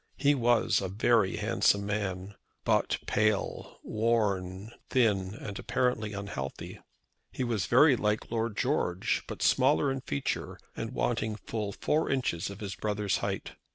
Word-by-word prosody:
He 145 +1 +4
was 120 -3 +3
a 95 - -2
very 105 0 +2
handsome 100 0 +2
man, 100 -2 -3 0.3
but - - +2
pale, 110 -1 0
worn, 105 -3 0 0.2
thin, 105 -6 +2
and 100 -3 -7
apparently 125 -4 0
unhealthy. 95 -10 -6 0.5
He - - -3
was 115 -6 -1
very 135 +3 +6
like 105 -1 -1
Lord 115 -2 -1
George, 105 -9 0
but - - -5
smaller 80 - +3
in 135 0 -3
feature, 70 - -3 0.2
and - - -4
wanting 85 - -1
full 105 -1 -4
four 155 +10 0
inches 100 -10 -1
of 100 +1 -9
his 100 -2 -4
brother's 105 -1 -1
height. - - -3
105 Hz, 140 wpm, -29 LUFS, 100-120 Hz, 0.5 s, very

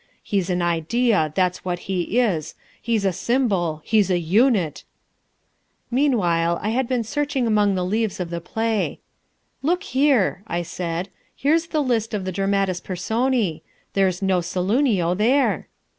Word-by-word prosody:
He's 195 -3 -1
an 180 -1 0
idea, 175 +1 +1
that's 180 -1 0
what 180 -1 -2
he 190 +3 -1
is, 170 -10 0 0.3
he's 225 -4 0
a 190 - +2
symbol, 190 - 0
he's 210 -4 +3
a 180 - +2
unit 185 - +2 0.6
" - - -46
Meanwhile 175 - +2
I 210 - 0
had 250 +2 0
been 250 -2 0
searching 285 +2 -1
among 210 -3 +2
the 180 -1 -1
leaves 215 +2 -1
of 175 -2 -4
the 170 0 -3
play. 220 +4 -1 0.6
"Look 345 +6 0
here," 260 -9 +2
I 175 -3 -2
said, 175 +1 -4 0.3
"here's 320 +4 +1
the 310 -3 0
list 225 -4 0
of 195 -3 -3
the 185 - -2
Dramatis 195 -1 0
Personae. 205 -1 -1 0.3
There's 190 -1 +1
no 190 -1 +2
Saloonio 185 +1 +1
there." 250 +8 +2
200 Hz, 150 wpm, -22 LUFS, 180-240 Hz, 0.6 s, he's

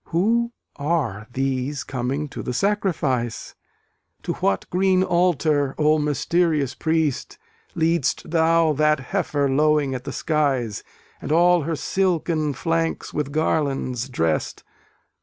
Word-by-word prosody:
Who 230 +8 +1 0.3
are 140 - -1
these 135 +2 -2
coming 135 +4 -3
to - - -6
the 125 - -4
sacrifice? 150 - -1 0.7
To - - -2
what 95 -1 -1
green 185 0 +3
altar, 155 -6 +1
O 155 0 +3
mysterious 150 -1 +1
priest, 160 -3 -1 0.4
Lead'st 165 -4 0
thou 165 -1 +3
that 150 0 +2
heifer 145 -1 -1
lowing 150 0 +2
at 125 -1 -5
the - - -4
skies, 135 -9 -1 0.4
And - - -5
all 175 +2 +4
her 165 +2 -2
silken 165 -4 0
flanks 165 +4 -2
with 145 -2 -2
garlands 135 -5 -1
drest? 80 -10 -1
150 Hz, 120 wpm, -23 LUFS, 135-165 Hz, 0.7 s, all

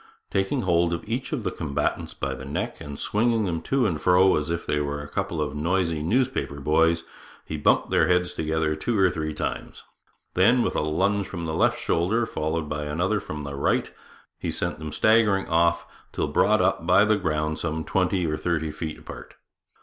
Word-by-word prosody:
Taking 95 0 0
hold 85 -1 +2
of 85 - -9
each 120 +4 -3
of 135 -7 -2
the 95 - -1
combatants 75 -4 -2
by - - -3
the - - -8
neck, 70 +2 -4
and 70 -1 -7
swinging 110 +3 +1
them 85 -3 -2
to 135 +8 +1
and 80 -7 -1
fro 90 +2 +5
as 75 +1 -2
if 85 0 -2
they 75 - 0
were 70 0 -2
a 70 - -7
couple 90 +1 -3
of 75 -1 -1
noisy 85 0 0
newspaper 115 - 0
boys, 80 +3 +2 0.4
he 80 - -5
bumped 75 - +2
their 80 - +4
heads 90 0 +2
together 80 0 -1
two 110 +9 -1
or 95 -2 +4
three 75 0 -3
times; - - -5 0.5
then, 115 +7 +4
with - - -1
a - - +1
lunge 95 +6 0
from 85 -3 -5
the 80 - -3
left - - +2
shoulder, 105 +8 +1
followed 80 -3 -2
by 75 0 -3
another 90 +8 0
from 75 -4 -6
the 70 0 -6
right, 70 - 0 0.5
he - - -3
sent - - -3
them 80 -1 -6
staggering 110 -2 +3
off, 85 0 +2 0.3
till - - -1
brought - - +3
up 80 - 0
by 90 +3 +6
the 110 0 +3
ground 80 -5 -1
some 80 -1 -2
twenty 90 +2 0
or 75 -1 -1
thirty 80 -2 -1
feet 80 0 -5
apart. - - -11
85 Hz, 200 wpm, -25 LUFS, 75-95 Hz, 0.5 s, by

